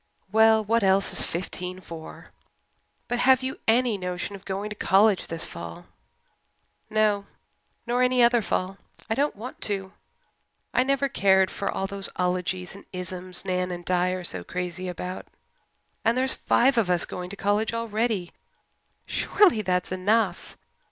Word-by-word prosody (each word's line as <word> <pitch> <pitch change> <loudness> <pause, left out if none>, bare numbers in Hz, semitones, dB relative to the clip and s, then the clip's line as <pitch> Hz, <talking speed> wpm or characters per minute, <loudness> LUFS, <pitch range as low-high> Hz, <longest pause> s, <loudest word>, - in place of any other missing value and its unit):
"Well, 220 0 +5
what 230 +1 +1
else 195 0 +3
is - - -1
fifteen 180 +1 -4
for? 165 -3 -10 0.8
But 245 - -1
have 260 0 +5
you 260 +1 -4
any 230 -2 +3
notion 180 +2 -4
of 195 - -13
going 200 +2 -3
to - - -4
college 200 0 +3
this 165 0 -2
fall?" 85 -1 -8 1.0
"No 210 -2 +2 0.6
nor 245 +1 +1
any 250 -1 +4
other 240 0 +5
fall. 190 -1 -2 0.3
I - - +5
don't 285 +5 0
want 230 +5 -9
to. 195 -2 -3 0.8
I - - +4
never 275 +1 +1
cared 190 -6 +3
for - - -2
all 195 - -2
those 195 0 -3
ologies 180 0 -1
and 200 - -13
isms 180 0 -5
Nan 180 -1 0
and 175 -1 -6
Di 180 0 +2
are 185 0 -3
so 90 - -2
crazy 180 - -4
about. 180 +1 -6 0.8
And 230 +2 +2
there's 260 +1 +2
five 255 0 +3
of 200 -5 +1
us 175 -1 +3
going 180 0 -6
to 200 - -7
college 205 +2 +1
already. 225 -4 -1 0.7
Surely 370 - +3
that's 180 -3 -1
enough. 205 +5 0
195 Hz, 155 wpm, -26 LUFS, 180-225 Hz, 1.0 s, Well